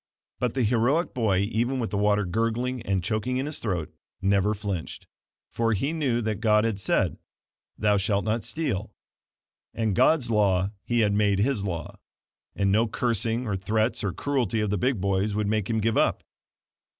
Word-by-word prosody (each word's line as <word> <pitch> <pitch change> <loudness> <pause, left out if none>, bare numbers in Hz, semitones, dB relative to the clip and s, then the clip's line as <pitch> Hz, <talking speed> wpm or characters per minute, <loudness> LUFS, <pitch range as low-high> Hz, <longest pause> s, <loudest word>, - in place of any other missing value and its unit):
But 125 -1 -1
the 130 - +1
heroic 125 - +1
boy 105 -6 +1
even 120 +4 0
with 115 -5 -2
the 100 - -1
water 105 0 +2
gurgling 115 +6 -1
and 95 -4 -1
choking 110 +5 -1
in 130 - -1
his 150 0 -3
throat, 90 -8 -3 0.3
never 100 +2 +2
flinched, 100 -5 -5 0.5
for 115 -1 +1
he 135 +10 -1
knew 135 -7 0
that 110 -1 -2
God 105 -2 +4
had 110 -3 -1
said: 95 - 0 0.6
"Thou 105 -1 +2
shalt 100 0 0
not 110 +1 0
steal," 110 - -3 0.8
and 110 -4 0
God's 125 - +3
law 100 -3 +2
he 120 +2 0
had 105 -2 +2
made 100 -1 +2
his 110 0 +1
law; 85 -5 -5 0.6
and 100 -1 +1
no 110 +3 +3
cursing, 115 +1 -1
or 105 -4 -1
threats, 110 +5 0
or 100 - 0
cruelty 120 -3 -1
of 105 -2 0
the - - +1
big 125 -1 +1
boys 100 +2 0
would 105 0 0
make 105 -1 -1
him 110 -1 +1
give 110 +1 +1
up. - - +2
110 Hz, 180 wpm, -26 LUFS, 100-120 Hz, 0.8 s, God